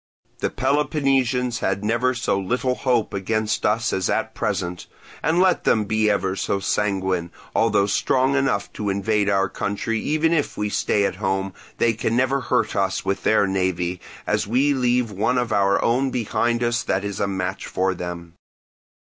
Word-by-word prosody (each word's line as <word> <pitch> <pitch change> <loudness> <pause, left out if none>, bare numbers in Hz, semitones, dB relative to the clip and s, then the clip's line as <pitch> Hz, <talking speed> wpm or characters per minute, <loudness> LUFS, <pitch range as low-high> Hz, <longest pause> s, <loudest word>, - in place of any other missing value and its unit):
The - - 0
Peloponnesians 135 -4 +1
had 95 +1 -1
never 120 +3 +1
so 120 -4 0
little 125 +6 0
hope 125 -3 0
against 105 +2 0
us 110 +2 +1
as 95 -2 0
at - - -1
present; 90 0 -3 0.3
and 160 +3 +1
let 185 -1 +3
them 110 -1 +2
be 110 +1 +1
ever 95 -2 0
so 100 - -1
sanguine, 95 -4 -1 0.2
although 105 -3 +3
strong 130 +6 +1
enough 135 -8 0
to 105 -1 -3
invade 100 +1 +1
our 95 -1 +2
country 105 +4 -2
even 155 +5 +1
if 150 -4 -1
we 105 0 -1
stay 100 0 +1
at 95 - -2
home, 95 -1 -1 0.2
they 115 - +3
can 115 +1 -1
never 130 +2 +2
hurt - - 0
us 95 -1 0
with 100 - -1
their 110 -2 +3
navy, 90 -2 -1 0.2
as - - 0
we 135 +6 +2
leave 125 -3 +1
one 105 +6 0
of 120 -2 0
our 100 -1 +3
own 130 +3 +2
behind 120 0 0
us 120 0 +1
that 95 - -1
is 100 -2 -4
a 100 - +1
match 95 0 -3
for 95 +1 0
them. 85 -1 -7
105 Hz, 175 wpm, -22 LUFS, 95-125 Hz, 0.3 s, let